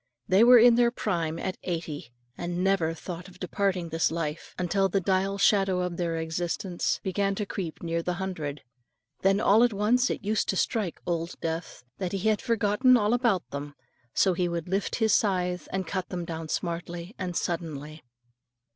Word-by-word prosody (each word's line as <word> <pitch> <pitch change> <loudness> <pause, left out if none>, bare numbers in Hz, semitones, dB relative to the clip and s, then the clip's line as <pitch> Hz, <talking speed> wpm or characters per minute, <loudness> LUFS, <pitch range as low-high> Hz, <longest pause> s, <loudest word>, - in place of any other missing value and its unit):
They 190 +4 +5
were 245 +1 +9
in 240 +1 +8
their 240 -1 +5
prime 170 -9 -2
at 185 +2 -4
eighty, 160 -7 -4 0.2
and 175 +1 -3
never 180 -4 +2
thought 175 +2 -7
of 185 -1 -16
departing 185 -2 -1
this 165 0 +1
life, 160 -1 -4
until 195 +2 +1
the 195 - +1
dial 195 +1 0
shadow 195 -2 +3
of 180 -1 -3
their 170 -2 -1
existence 170 +2 -2
began 195 +1 0
to 210 - -2
creep 180 -5 -5
near 170 0 -1
the 180 +1 -2
hundred. 160 -7 -4 0.6
Then 195 +1 +3
all 215 +2 +5
at 240 -2 +3
once 235 +5 +2
it - - -4
used 215 0 0
to - - +1
strike 205 -3 -1
Old 170 0 -3
Death, 165 -4 -4 0.2
that 185 -1 -3
he 195 +2 +1
had 215 - +1
forgotten 230 +1 +3
all 210 0 +2
about 235 -7 +1
them, 145 0 -6 0.4
so 190 +6 +3
he 175 0 0
would 170 -1 -3
lift 195 +2 -1
his 220 -3 +2
scythe, 180 -3 +1
and 190 -1 -2
cut 185 +1 -3
them 175 -2 -4
down 160 -1 -5
smartly 170 +2 -4
and 180 -2 -2
suddenly. 155 -3 -4
180 Hz, 180 wpm, -27 LUFS, 170-200 Hz, 0.6 s, were